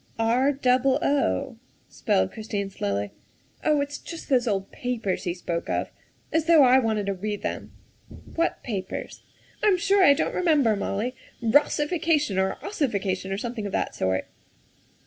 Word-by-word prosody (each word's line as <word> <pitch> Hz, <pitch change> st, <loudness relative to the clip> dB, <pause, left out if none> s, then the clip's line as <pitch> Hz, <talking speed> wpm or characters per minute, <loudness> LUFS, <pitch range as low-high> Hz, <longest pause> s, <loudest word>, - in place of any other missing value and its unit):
" -, -, -26 dB, 0.2 s
R 265 Hz, +3 st, +3 dB
double 260 Hz, -1 st, +2 dB
o," 185 Hz, -, 0 dB, 0.3 s
spelled 95 Hz, 0 st, 0 dB
Christine 205 Hz, -2 st, -4 dB
slowly. 100 Hz, -, -2 dB, 0.3 s
" -, -, -33 dB
Oh, 300 Hz, -2 st, +3 dB
it's 285 Hz, +1 st, -4 dB
just 335 Hz, -, -9 dB
those 250 Hz, -3 st, +3 dB
old 195 Hz, -3 st, -1 dB
papers 225 Hz, -6 st, -3 dB
he 175 Hz, -1 st, -1 dB
spoke 170 Hz, -1 st, -4 dB
of. -, -, -1 dB, 0.4 s
As 320 Hz, -1 st, +2 dB
though 330 Hz, -3 st, +7 dB
I 255 Hz, 0 st, +6 dB
wanted 220 Hz, -4 st, 0 dB
to 200 Hz, -, -1 dB
read 205 Hz, +2 st, -4 dB
them." -, -, -4 dB, 0.3 s
" -, -, -16 dB
What 335 Hz, +1 st, 0 dB
papers?" 195 Hz, -6 st, -5 dB, 0.4 s
"I'm 410 Hz, -3 st, +4 dB
sure 390 Hz, +2 st, +3 dB
I 285 Hz, -, +8 dB
don't -, -, -1 dB
remember, 295 Hz, -11 st, +3 dB
Molly. 205 Hz, +4 st, -2 dB, 0.3 s
Rossification 295 Hz, -, +2 dB
or 190 Hz, 0 st, 0 dB
ossification 200 Hz, -, -1 dB
or 195 Hz, -, -1 dB
something 225 Hz, -1 st, -4 dB
of 200 Hz, -, -8 dB
that -, -, -1 dB
sort." 95 Hz, 0 st, -1 dB
235 Hz, 165 wpm, -25 LUFS, 195-290 Hz, 0.4 s, I